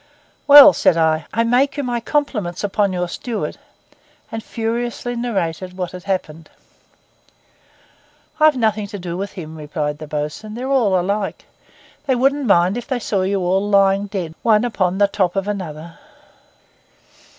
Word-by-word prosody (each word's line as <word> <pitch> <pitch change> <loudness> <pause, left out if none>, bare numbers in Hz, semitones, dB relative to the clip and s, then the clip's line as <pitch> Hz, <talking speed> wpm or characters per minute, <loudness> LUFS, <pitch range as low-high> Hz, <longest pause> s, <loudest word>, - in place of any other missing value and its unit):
'Well,' 290 0 +10
said 170 - +2
I, 160 -1 +1
'I 230 - +1
make 250 +5 +1
you 285 - -1
my 245 -2 -2
compliments 230 - -2
upon 205 0 0
your 180 -1 -2
steward,' 225 +5 -5 0.7
and 225 0 -5
furiously 240 +1 -3
narrated 185 -6 -3
what 180 -2 -3
had 180 0 -10
happened. 165 -5 -4 1.9
'I've 310 -3 +5
nothing 215 -3 0
to 205 - -7
do 175 -2 -6
with 200 +2 -5
him,' 160 -4 -8
replied 150 -1 -4
the 155 - -8
bo's'un. 150 +9 -5
'They're 250 +2 -5
all 230 -9 +2
alike. 200 +3 -3 0.6
They 260 - +2
wouldn't 270 +2 +1
mind 185 +1 +3
if 245 - -6
they 260 -3 -1
saw 205 -5 -1
you 195 +1 0
all 190 +3 0
lying 195 0 +3
dead 185 -5 -5
one 220 0 +3
upon 190 -5 -1
the 205 0 +4
top 190 -3 -1
of 195 0 -1
another. 170 -5 -6
200 Hz, 155 wpm, -19 LUFS, 175-235 Hz, 1.9 s, Well